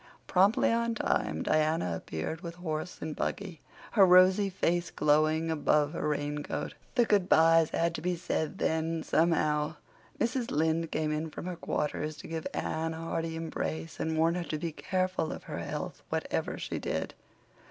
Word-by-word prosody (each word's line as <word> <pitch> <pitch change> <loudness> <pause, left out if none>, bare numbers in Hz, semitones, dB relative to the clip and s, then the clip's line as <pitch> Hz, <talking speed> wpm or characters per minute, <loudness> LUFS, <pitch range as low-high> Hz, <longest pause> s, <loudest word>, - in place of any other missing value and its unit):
Promptly 200 +8 +4
on 235 0 +1
time - - 0
Diana 155 - +1
appeared 80 - -4
with 170 -2 -6
horse 170 -1 -4
and 155 -1 -4
buggy, 185 -6 -3 0.3
her 205 - +6
rosy 185 +2 +6
face 175 -2 0
glowing 155 +2 +2
above 150 -1 +2
her 160 - -2
raincoat. 145 0 -2 0.2
The 240 -3 +5
good 200 -4 +2
byes 165 0 +6
had 170 0 0
to 155 - -5
be 180 +2 0
said 160 -2 -2
then 160 0 0
somehow. 155 -2 +2 0.4
Mrs. 240 0 0
Lynde 160 +2 +1
came 155 -1 0
in 155 +1 -2
from 155 - -7
her 180 -1 -3
quarters 150 -2 -2
to - - -9
give 160 -1 -4
Anne 160 0 -2
a - - -7
hearty 165 0 -3
embrace 80 - -4
and 160 0 -1
warn 165 +1 +3
her 175 0 -2
to 155 - -3
be 165 +2 -3
careful 185 0 -1
of - - -7
her - - -5
health, - - -5
whatever - - -2
she - - -4
did. - - -3
165 Hz, 170 wpm, -30 LUFS, 155-180 Hz, 0.4 s, her